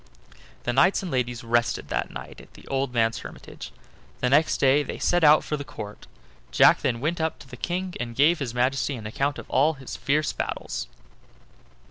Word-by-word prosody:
The 120 - -1
knights 180 +10 +3
and 180 - -5
ladies 125 -2 -1
rested 120 0 0
that - - -1
night - - -9
at - - -19
the - - -15
old 135 -1 -1
man's 115 -2 +1
hermitage, - - -10 0.5
and 125 - 0
next 155 +3 +4
day 135 +2 +4
they 145 - -5
set 175 -1 +1
out 150 0 +7
for 150 - -3
the 145 - -5
Court. 105 -6 -9 0.4
Jack - - +5
then 120 -3 -1
went 160 +4 -1
up 160 0 -1
to - - -14
the 125 - -10
King, 180 +7 -3
and 120 -1 -4
gave 155 +6 +4
his 125 -4 -4
Majesty 135 +3 +1
an 110 -3 -9
account 135 +6 -1
of - - -9
all 150 +4 +2
his 135 -2 -8
fierce 150 +2 0
battles. - - -4
135 Hz, 195 wpm, -25 LUFS, 120-155 Hz, 0.5 s, out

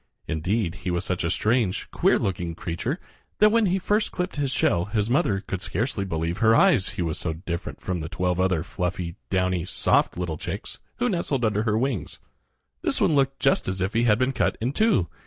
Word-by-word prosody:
Indeed, 90 +3 -1
he 95 - -3
was 90 +2 -1
such 90 -1 -1
a 85 - 0
strange, 110 +1 +1
queer - - +3
looking 85 -3 -2
creature 90 - -3 0.4
that 210 0 +6
when 225 -2 +3
he 185 +1 +2
first 205 +3 0
clipped 180 -3 -3
his 140 -2 0
shell 90 -8 +2
his 105 +1 -1
mother 105 -7 +2
could 95 -2 -5
scarcely 100 +2 -2
believe 85 +1 -2
her 110 0 +5
eyes, 150 - +4
he 90 - 0
was 80 -2 -2
so 80 - -2
different 85 +2 -5
from 90 -2 -2
the 80 0 -5
twelve 90 0 -1
other 95 -3 +2
fluffy, 90 -2 -3
downy, 90 -2 +1
soft 90 - +1
little 85 -3 -3
chicks 90 +6 -5 0.2
who 245 - 0
nestled 150 - 0
under 105 -1 +1
her 110 -1 +2
wings. 125 -4 -2 0.6
This - - 0
one 155 - +3
looked 135 -1 +1
just 135 - +2
as 95 0 -2
if 95 +2 -1
he 115 +1 +2
had 105 -3 +4
been 130 +2 +1
cut - - 0
in 120 +4 -1
two. 210 - +3
100 Hz, 210 wpm, -25 LUFS, 90-130 Hz, 0.6 s, that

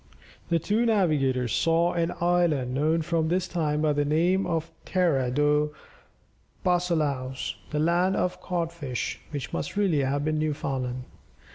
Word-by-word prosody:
The 170 - +3
two 210 +8 +1
navigators 145 - +2
saw 165 +8 +2
an 170 -1 0
island 170 -7 +2
known 155 +4 +1
from 165 -1 0
this 180 +2 0
time 150 -3 -1
by 150 -1 +3
the 145 0 +1
name 175 +6 +2
of 165 -2 -2
Terra 160 -9 +1
dos 150 +3 +2 1.0
Bacalhaos 155 -8 0 0.2
the 150 - -3
land 175 +4 +2
of 180 - -1
cod 170 -2 -2
fish 140 -8 -4
which 145 -3 -5
must - - -3
really 190 -8 +2
have 140 +2 0
been 155 0 0
Newfoundland. 135 -4 -2
155 Hz, 145 wpm, -26 LUFS, 145-175 Hz, 1.0 s, The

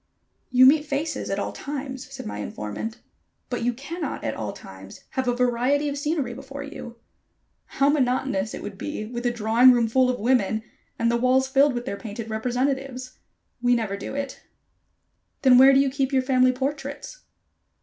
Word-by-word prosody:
"You 255 0 +6
meet 295 +3 +6
faces 295 +3 -2
at - - -1
all - - -2
times," 270 -2 -6
said - - -8
my 105 0 -5
informant, 105 - -5 0.5
"but 245 - -2
you 240 +1 +1
cannot 295 +8 -5
at - - -1
all - - -4
times - - -12
have 260 -3 -2
a 245 - +2
variety 250 +4 +1
of 280 - -3
scenery 290 -3 -2
before 280 +1 -8
you. 275 -5 -9 0.8
How 275 - +4
monotonous 255 -7 +1
it - - -8
would 200 -1 -8
be 295 -8 -4
with 240 +2 -3
a - - +2
drawing 235 +2 +5
room 235 -2 +2
full 255 +3 +3
of 250 - -1
women, 220 -2 +1 0.3
and 230 0 +1
the 235 - +2
walls 255 +2 +3
filled 275 0 +3
with 240 0 -4
their 200 - -4
painted 220 +1 -7
representatives. 255 +3 -2 0.4
We 245 0 +3
never 220 -4 -2
do 200 - -6
it." 280 -1 -5 1.0
"Then 255 -2 +7
where 265 +1 +9
do 270 - +5
you 275 -1 +2
keep 270 0 -1
your 265 -1 +2
family 255 -1 +4
portraits?" 280 - -5
255 Hz, 180 wpm, -24 LUFS, 235-275 Hz, 1.0 s, where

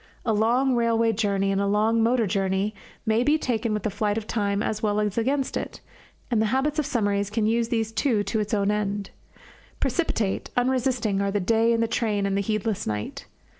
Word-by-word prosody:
A 225 - +2
long 240 +5 +2
railway 230 -1 +2
journey 200 -2 0
and 195 0 +1
a 200 - +1
long 215 +3 +2
motor 230 0 +3
journey 195 +1 0 0.3
may 220 +1 +2
be 295 +5 +3
taken 235 -5 -1
with 210 -1 -2
the 215 - -1
flight 205 +1 -1
of 220 - -3
time 205 -2 -1
as 215 -1 -2
well 210 -1 +1
as 210 -2 -1
against 265 +4 0
it, - - -4 0.5
and 225 -2 +2
the 220 - +2
habit 275 +6 0
of 295 - 0
summaries 205 -6 0
can 215 0 0
use 230 +1 +1
these 225 -2 -1
too 225 -3 +1
to 210 +3 -1
its 210 +1 -2
own 200 0 +1
end. 205 -1 -2 0.7
Precipitate, 225 - -1
unresisting, 245 -5 +1
are 200 - 0
the 205 +1 0
day 225 +4 +2
in 230 0 +2
the 230 - +2
train 215 -3 0
and 195 0 0
the 200 - +1
heedless 215 0 -2
night. 105 0 -4
220 Hz, 205 wpm, -25 LUFS, 205-235 Hz, 0.7 s, motor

